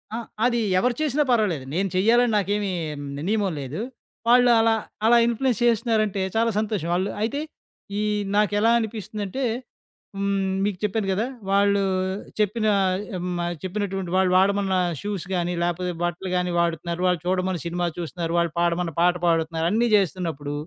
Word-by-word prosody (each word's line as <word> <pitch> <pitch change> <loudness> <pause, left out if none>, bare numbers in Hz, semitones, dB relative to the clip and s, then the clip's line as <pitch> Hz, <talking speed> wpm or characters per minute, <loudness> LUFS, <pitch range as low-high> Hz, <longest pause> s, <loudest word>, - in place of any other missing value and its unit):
ఆ! - - -2 0.3
అది 240 -1 +2 0.2
ఎవరు 240 +4 +1
చేసినా 295 -1 +2
పర్వాలేదు. 195 - +1
నేను 195 +2 0
చెయ్యాలని 230 +5 +4
నాకేమి 205 0 0 0.6
నియమం 205 -3 +1
లేదు. 140 +9 -5 0.5
వాళ్ళు 245 +1 +6
అలా 225 0 +4 0.3
అలా 235 +1 +6
ఇన్‌ఫ్లుయెన్స్ 235 0 0
చేస్తున్నారంటే, 220 -4 +1
చాలా 230 +1 +3
సంతోషం. 205 -6 -2
ఆళ్ళు 190 +2 0
అయితే 250 +6 -1 0.6
ఈ - - 0 0.3
నాకెలా 210 +2 +3
అనిపిస్తుందంటే 215 +1 -4 0.7
హ్మ్, 200 -1 0 0.2
మీకు 205 -3 -1
చెప్పాను 210 0 0
గదా. 205 +5 0 0.2
వాళ్ళు 200 0 +3 0.6
చెప్పిన 215 +1 +1 0.7
మ - - -2 0.2
చెప్పినటువంటి 195 -2 -3
వాళ్ళు 190 -1 +3
వాడమన్న 195 0 +2 0.3
షూస్ 205 -4 -4
గాని, 175 0 0
లేపోతే 175 +1 -1
బట్టలు 175 +2 -2
గాని 180 0 0
వాడుతున్నారు. 170 +1 -1
వాళ్ళు 180 -2 +1
చూడమన్న 185 -1 0
సినిమా 175 +1 -1
చూస్తున్నారు. 170 0 -4
వాళ్ళు 170 -1 0
పాడమన్న 170 -1 0
పాట 175 0 +4
పాడుతున్నారు. 165 0 +1
అన్నీ 235 +2 +2
చేస్తున్నప్పుడు 165 -6 -2
195 Hz, 140 wpm, -24 LUFS, 175-220 Hz, 0.7 s, వాళ్ళు